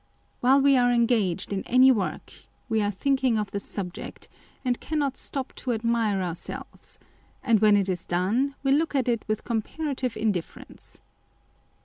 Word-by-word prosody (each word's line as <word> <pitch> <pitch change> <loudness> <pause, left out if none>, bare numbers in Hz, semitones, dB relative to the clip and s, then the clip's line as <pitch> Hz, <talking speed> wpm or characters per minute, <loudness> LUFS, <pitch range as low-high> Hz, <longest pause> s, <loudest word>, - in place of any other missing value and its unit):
While 265 +3 +4
we 275 -1 +5
are 245 -1 +4
engaged 230 -7 +1
in 195 - -1
any 255 +2 +6
work, 210 -7 -2 0.3
we 220 -2 +1
are 205 - +1
thinking 260 +3 +1
of 210 -2 -2
the 200 - -2
subject, 185 -3 -7 0.4
and 245 -1 0
cannot 290 -4 -1
stop 270 -2 -5
to 250 - -2
admire 225 -3 0
our 175 -2 -2
selves; 170 - -8 0.5
and 230 -5 +3
when 210 -1 +5
it 195 -1 +1
is 180 -3 -2
done, 220 +11 0
we 270 - +2
look 300 +2 +2
at 260 -3 +1
it 235 -3 0
with 215 0 -2
comparative 255 +2 -3
indifference. 200 -6 -4
235 Hz, 160 wpm, -26 LUFS, 205-265 Hz, 0.5 s, any